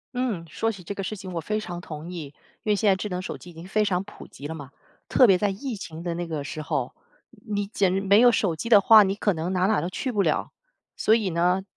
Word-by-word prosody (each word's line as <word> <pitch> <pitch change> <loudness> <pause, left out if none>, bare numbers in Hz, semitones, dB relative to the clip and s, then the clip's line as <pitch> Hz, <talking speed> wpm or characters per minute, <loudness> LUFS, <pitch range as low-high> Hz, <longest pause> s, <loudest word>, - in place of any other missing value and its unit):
嗯， 230 -10 -2
说 225 +8 -1
起 195 -4 -11
这 190 - -5
个 195 - -5
事 215 - -4
情 185 -2 -8
我 165 - -2
非 215 +6 -2
常 175 -4 -6
同 160 +1 -8
意。 170 -4 -5 0.4
因 215 - +1
为 - - +4
现 205 +1 0
在 190 - +5
智 210 +2 -4
能 180 0 -3
手 - - -5
机 175 - -13
已 - - -13
经 165 +2 -10
非 215 +2 +1
常 190 -2 0
普 205 - -12
及 140 - -12
了 160 - -5
嘛， 140 -3 -9 0.4
特 255 - +6
别 190 -2 +5
在 205 - +1
疫 235 +5 -4
情 165 -4 -8
的 170 -1 -2
那 175 0 -4
个 155 -3 -3
时 155 +2 -6
候， 155 - -2 0.4
你 205 -2 -4
简 195 -2 +1
直 - - +1
没 200 +2 +5
有 245 0 +7
手 195 -7 +1
机 230 +9 -5
的 210 - +8
话， 215 +2 +8
你 195 0 0
可 205 -1 +1
能 165 +2 -3
哪 180 0 +1
儿 - - +4
哪 220 - +3
儿 - - +1
都 175 - -3
去 255 +7 -3
不 210 -4 +1
了。 - - 0 0.4
所 220 - +3
以 210 -6 0
呢， 180 +3 +1
190 Hz, 310 characters per minute, -25 LUFS, 170-210 Hz, 0.4 s, 的